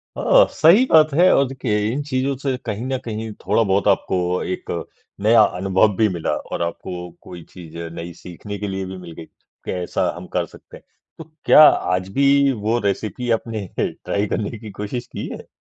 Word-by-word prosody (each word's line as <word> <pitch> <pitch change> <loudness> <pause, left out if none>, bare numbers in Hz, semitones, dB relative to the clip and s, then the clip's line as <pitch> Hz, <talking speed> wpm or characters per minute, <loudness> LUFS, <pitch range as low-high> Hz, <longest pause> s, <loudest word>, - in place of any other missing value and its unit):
अ, - - +5
सही 180 +11 +5
बात 155 -2 +5
है 180 +5 +5
और 140 - +3
देखिए 125 -5 -2
इन 140 +4 -2
चीज़ों 135 0 -1
से 135 -1 -2
कहीं 105 +4 -4
न 130 0 -1
कहीं 110 0 -5
थोड़ा-बहुत 100 -3 +2
आपको 95 -1 +1 0.3
एक 90 - -5 0.5
नया 110 +1 +6 0.2
अनुभव 95 +2 +2
भी 110 -1 +4
मिला, 85 -3 -2
और - - -6
आपको 90 +1 -5
कोई 85 -2 -11
चीज़ 85 -2 -11 0.2
नई 85 +1 -7
सीखने 100 +5 -9
के 105 - -3
लिए 95 0 -4
भी 95 0 -7
मिल 90 -2 -10
गई - - -8
कि - - -12
ऐसा 90 -1 -1
हम - - -9
कर - - 0
सकते - - -15
हैं। - - -21 0.3
तो 160 - -8 0.2
क्या 155 - +8
आज 90 0 +1
भी 140 +1 +4
वो 115 +1 -1
रेसिपी 105 +3 -2
आपने 110 -3 -2
ट्राई 100 +1 -2
करने 110 +3 -3
की 110 -1 -10
कोशिश 105 +5 -5
की - - -6
है? - - -12
105 Hz, 190 wpm, -21 LUFS, 95-130 Hz, 0.5 s, क्या